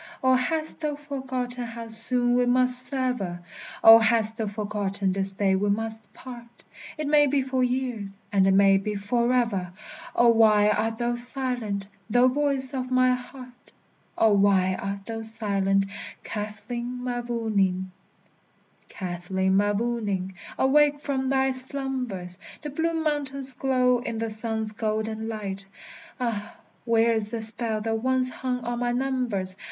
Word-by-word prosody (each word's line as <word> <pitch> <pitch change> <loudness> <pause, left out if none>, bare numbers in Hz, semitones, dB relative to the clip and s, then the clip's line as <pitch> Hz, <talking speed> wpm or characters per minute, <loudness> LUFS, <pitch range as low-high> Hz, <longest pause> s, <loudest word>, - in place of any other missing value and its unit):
Oh, 260 0 +5
hast 310 +5 0
thou 300 -2 -2
forgotten 260 -4 -4
how 230 0 -7
soon 245 +2 0
we 245 0 +2
must 250 0 +3
sever? 250 -10 -2 0.4
Oh! 225 0 +11
hast 225 0 +2
thou 220 -2 -2
forgotten 205 -2 -2
this 195 0 -1
day 190 -1 +2
we 205 +2 0
must 220 +1 -2
part? 240 -2 -12 0.3
It 305 - -3
may 295 0 +5
be 275 0 +1
for 260 -1 0
years, 245 -6 -2
and 195 -2 +3
it 195 - +4
may 195 0 +5
be 210 +2 -3
forever! 230 -3 0 0.4
Oh, 240 0 +5
why 215 -2 +5
art 225 +1 0
thou 240 +1 0
silent, 240 -5 -2 0.2
thou 245 +3 +5
voice 275 -1 0
of 255 -1 -3
my 255 0 +4
heart? 250 0 -10 0.4
Oh! 220 -2 +4
why 195 -2 +3
art 195 +1 -5
thou 225 0 -5
silent, 200 -3 0 0.4
Kathleen 230 +4 -5
Mavourneen? 220 -7 -1 1.0
Kathleen 190 +1 -2
Mavourneen, 205 -2 0 0.2
awake 290 +2 +4
from 270 -3 -2
thy 265 0 +2
slumbers! 255 -9 -3 0.2
The 295 - -5
blue 330 +3 -1
mountains 280 -4 0
glow 250 -1 +2
in 230 -2 -4
the 225 0 -2
sun's 220 0 -2
golden 220 0 -2
light; 195 -3 -5 0.5
Ah, 220 -4 -3 0.3
where 230 0 +3
is 215 -2 +1
the 230 - -4
spell 220 0 -1
that 225 +1 -1
once 260 0 +2
hung 250 -1 -3
on 240 0 -2
my 245 0 0
numbers? 245 -8 0
230 Hz, 145 wpm, -26 LUFS, 205-255 Hz, 1.0 s, Oh